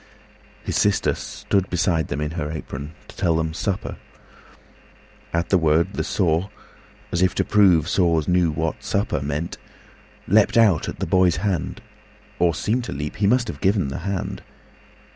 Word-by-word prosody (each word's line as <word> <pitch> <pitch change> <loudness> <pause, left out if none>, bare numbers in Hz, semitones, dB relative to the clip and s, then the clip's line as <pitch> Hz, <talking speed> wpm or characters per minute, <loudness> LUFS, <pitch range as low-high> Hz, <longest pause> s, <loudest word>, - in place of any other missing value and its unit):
His - - -3
sister 105 -1 +2
stood 95 -2 -2
beside 85 -3 +1
them 70 - -3
in 75 0 -2
her 80 -3 -3
apronTo 75 -2 -6 0.2
tell 85 -4 0
them 80 0 -1
"Supper." 100 +3 -3 1.3
At 85 +1 -1
the 95 - +4
word, 80 +4 +2
the - - -2
saw, 90 0 0 0.6
As 85 - 0
if 95 - +2
to - - +2
prove 90 -7 +4
saws 85 -5 +2
knew 90 -2 +3
what 80 +1 -3
supper 100 -8 -1
meant, 75 +4 -3 0.7
Leaped 105 +3 +4
out 105 -9 +4
at - - -7
the - - -2
boy's 90 -3 +3
hand, 95 -6 -2 0.6
or 85 -2 +3
seemed 110 +8 0
to - - -6
leap—He 75 +8 -2
must 120 +2 +3
have - - -7
given 95 -6 +2
the 70 - -5
hand. 95 +1 -4
85 Hz, 160 wpm, -22 LUFS, 80-100 Hz, 1.3 s, the